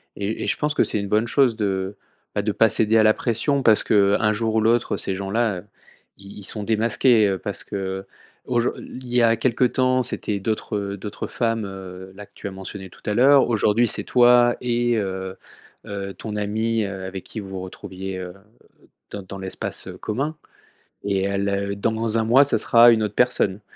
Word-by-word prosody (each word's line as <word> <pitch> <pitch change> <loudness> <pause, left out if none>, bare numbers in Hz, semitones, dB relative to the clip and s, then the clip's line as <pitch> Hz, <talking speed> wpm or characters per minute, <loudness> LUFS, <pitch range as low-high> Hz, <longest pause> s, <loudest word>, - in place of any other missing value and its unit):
et 100 +2 -3
et - - -3
je - - 0
pense 150 0 0
que - - +4
c'est 105 - 0
une 100 - -4
bonne 110 +2 +2
chose 125 -1 +3
de 95 -2 -2 0.4
bah, 105 - 0
de 105 +1 -1
pas 115 +3 +4
céder 110 +2 +3
à 110 - +5
la 110 0 +5
pression 130 +5 0
parce 110 -3 +5
que, - - -1 0.2
heu, - - -1
un 105 0 +2
jour 110 0 -1
ou 110 - +4
l'autre 115 +2 +1
ces 95 - -2
gens 95 0 -5
là, 110 -4 0
heu, - - -13 0.5
i 100 +1 -12
ils - - -11
sont 105 +2 -3
démasqués, 110 +1 +3
heu, 95 - -1
parce - - -4
que, - - -8
heu. 95 0 -4 0.4
Aujour 120 -1 0
i - - -9
i - - -9
il 125 - -10
y 125 - +5
a 115 0 +4
quelque 120 +1 +1
temps, 130 +1 +2
c'était 105 -4 -1
d'autres, 110 +1 -3
heu, 100 0 -4
d'autres 105 +1 -6
femmes, 115 -2 -1
heu, 95 -1 -9
là 105 +1 -10
que - - -34
tu - - -7
as - - -5
mentionné 95 0 -8
tout - - -18
à 105 - 0
l'heure. 135 +4 +5
Aujourd'hui 115 +1 +2
c'est - - 0
toi 120 -1 +5
et 120 -1 +1
heu 95 -2 -4 0.5
heu, 100 -1 -5
ton 105 +3 -6
amie, 110 +2 -1
heu, 95 -1 -5
avec 95 0 -6
qui 110 - -8
vous 100 -2 -8
vous 95 -1 -6
retrouviez, 95 0 -7
heu, 90 -1 -7 0.8
dans 100 -2 -6
dans 95 +1 -9
l'espace, 95 0 -4
heu, - - -8
commun 140 +8 -3 0.7
et 100 -1 0
heu, 100 - -2
le 100 0 -1
dans 110 +2 0
1 110 - +1
mois 130 +5 +5
ça 140 - +2
sera 120 0 +6
une 110 -1 +2
autre 105 -1 -4
personne 105 -5 +1
105 Hz, 225 wpm, -22 LUFS, 100-115 Hz, 0.8 s, sera